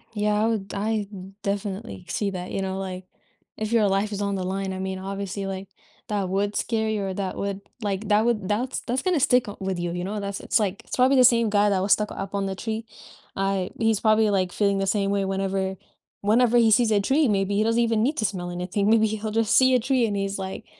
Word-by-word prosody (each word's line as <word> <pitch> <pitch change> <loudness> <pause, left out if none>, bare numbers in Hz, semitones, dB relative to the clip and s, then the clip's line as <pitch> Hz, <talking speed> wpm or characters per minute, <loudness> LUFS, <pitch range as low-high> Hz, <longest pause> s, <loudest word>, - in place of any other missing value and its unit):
Yeah, 210 0 +1
I - - +3
would 215 -4 -2
I 210 0 -1
d 190 -1 -9
definitely 200 0 -4
see 200 0 -1
that, 180 -1 -6
you 195 - -2
know, 190 0 -3
like, 185 -1 -5 0.5
if 215 0 -3
your 225 -3 +4
life 195 +2 0
is 205 0 -3
on 200 -1 -1
the 190 - -2
line, 190 +1 -2
I 185 - -5
mean, 190 0 -3
obviously 195 +1 -4
like, 195 0 -5 0.4
that 205 -3 -1
would 200 +2 0
scare 220 -2 0
you 215 -2 -1
or 190 - -3
that 190 -1 -3
would, 200 0 -3 0.2
like, 205 0 -3
that 210 +1 +4
would 215 -5 0
that's 230 +6 -1
that's 250 +2 -2
gonna 365 -4 +1
stick 250 -2 +3
up 205 - -9
with 190 -2 -2
you, 175 0 -2
you 175 +1 -3
know, 205 +3 -3
that's 200 0 -4
it's - - +1
like, 205 +1 -2
it's - - -5
probably 260 +2 +4
the 255 - +7
same 235 -2 +5
guy 205 0 +3
that 195 -2 +1
was 195 +2 +4
stuck 210 0 0
up 195 +1 -5
on 200 -1 0
the 195 0 -3
tree. 220 +3 -4 0.5
I 195 -1 -1
he's 225 -2 +2
probably, 215 0 +3
like, 185 -3 +1
feeling 200 0 +1
the 195 0 -1
same 195 0 +1
way 200 -1 +1
whenever 190 0 -1 0.5
whenever 235 +3 +3
he 230 -2 +5
sees 235 0 +4
a 205 -1 +3
tree, 275 +7 +2
maybe 200 -1 +1
he 215 - +3
doesn't 230 +1 +2
even 225 -2 +2
need 285 +6 0
to 215 - +1
smell 175 -3 -3
anything, 180 +3 -1
maybe 220 0 +5
he'll 215 0 -3
just 225 0 +2
see 260 0 +5
a 250 - +4
tree 255 0 +2
and 210 -2 -2
he's, 195 0 -2
like, 190 0 -6
205 Hz, 250 wpm, -25 LUFS, 195-220 Hz, 0.5 s, the